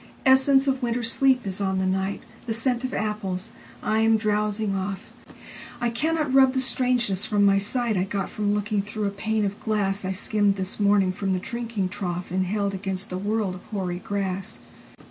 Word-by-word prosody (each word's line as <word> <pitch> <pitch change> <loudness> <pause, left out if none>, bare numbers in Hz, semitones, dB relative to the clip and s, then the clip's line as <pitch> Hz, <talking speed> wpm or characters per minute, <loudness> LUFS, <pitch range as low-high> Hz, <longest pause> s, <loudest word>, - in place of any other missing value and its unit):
Essence 265 +1 +5
of 270 0 +1
winter 240 0 -1
sleep 255 +2 +3
is 195 0 -4
on 190 -1 0
the 190 - 0
night, 190 +1 -1 0.2
The 225 - -1
scent 245 +1 0
of 255 - -2
apples: 205 -3 -3 0.3
I 215 +1 +1
am 225 0 +4
drowsing 210 -1 0
off.I 195 +4 -6
cannot 305 +3 0
rub 265 -1 +6
the 265 - +1
strangeness 245 -6 +1
from 205 -1 +3
my 195 0 +5
sightI 205 -2 0
got 195 -2 -2
from 205 -1 0
looking 210 0 0
through 210 +1 -4
a 200 - 0
pane 215 +1 -1
of 200 +1 -3
glassI 195 -3 0
skimmed 205 0 +2
this 190 +1 -2
morning 200 -2 +4
from 195 0 -2
the 185 - 0
drinking 230 -2 -3
troughAnd 185 -1 -2
held 200 +1 -1
against 195 +1 -4
the 185 - -3
world 205 -1 -1
of 185 - -10
hoary 185 -4 -3
grass. 195 +1 -3
205 Hz, 180 wpm, -25 LUFS, 195-230 Hz, 0.3 s, rub